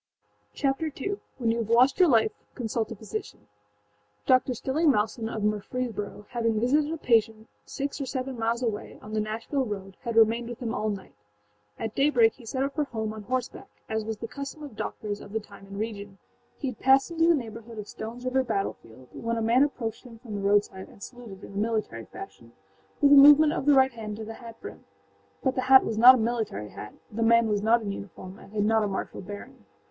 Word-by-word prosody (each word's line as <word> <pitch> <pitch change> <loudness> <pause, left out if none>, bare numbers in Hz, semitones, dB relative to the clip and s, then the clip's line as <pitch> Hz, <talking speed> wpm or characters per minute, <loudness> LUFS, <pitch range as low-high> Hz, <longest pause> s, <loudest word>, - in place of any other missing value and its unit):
Chapter 275 +3 0
II: 395 +8 -3 0.2
When 235 -3 +1
You 230 - -1
Have 225 -2 -3
Lost 250 +7 +4
Your 360 -3 +6
Life 225 -4 +4 0.2
Consult 225 -2 -2
a - - -4
Physician[edit] 215 +1 -7 0.8
Dr. 255 0 +3
Stilling 300 +7 +1
Malson, 220 0 -1
of 215 - -4
Murfreesboro, 210 0 -3
having 230 -3 0
visited 290 +6 +2
a 325 - -3
patient 225 -4 +1 0.2
six 280 +1 -4
or 270 - -3
seven 260 0 -3
miles 230 +1 -1
away, 220 -3 -3
on 215 - -10
the 215 - +1
Nashville 225 +6 -2
road, 195 -4 -6
had 235 -3 -4
remained 230 +1 +4
with 240 - -7
him 235 -2 -3
all 215 -2 -1
night. 200 -2 -6 0.6
At 225 -1 -4
daybreak 245 -6 +4
he 240 -3 -15
set 260 +3 -1
out 275 0 -2
for 300 -1 0
home 220 -4 -4
on 215 - -8
horse 250 +3 -1
back, - - -13 0.2
as 220 0 -2
was 220 0 -4
the 230 - -6
custom 280 +4 -7
of 285 -7 -9
doctors 210 -1 -4
of 200 - -11
the 220 - 0
time 200 -2 -14
and 195 0 -8
region. 205 -2 -5 0.4
He 270 - -3
had - - -9
passed 270 +4 +4
into 330 0 +2
the 340 - +6
neighborhood 230 -3 -7
of 210 - -5
Stoneâs 230 +4 -8
River 260 +1 +2
battlefield 130 - -4
when 230 0 -3
a - - -1
man 235 +4 +4
approached 235 -6 -1
him 240 -3 -12
from 225 -2 -10
the 200 - -3
roadside 200 -1 +1
and 200 - -14
saluted 235 -6 -10
in - - -10
the - - -6
military 215 - -2
fashion, 115 +5 -11 0.5
with 285 - +6
a - - +10
movement 295 +2 +8
of 295 - -3
the 290 - +7
right 265 0 +5
hand 215 -3 -7
to 220 - -6
the 225 - -7
hat 230 -1 -11
brim. - - -9 0.6
But 260 - +2
the 255 - -1
hat 265 0 +8
was 220 -1 -2
not 250 +3 +10
a - - 0
military 220 - -2
hat, 105 - -9 0.2
the 220 +2 -4
man 230 0 +5
was 205 -1 0
not 225 +2 +3
in 200 - -3
uniform 190 0 -9
and - - -15
had 210 -1 0
not 220 +1 +3
a - - 0
martial 195 - -4
bearing. 205 +2 -10
225 Hz, 225 wpm, -27 LUFS, 210-255 Hz, 0.8 s, a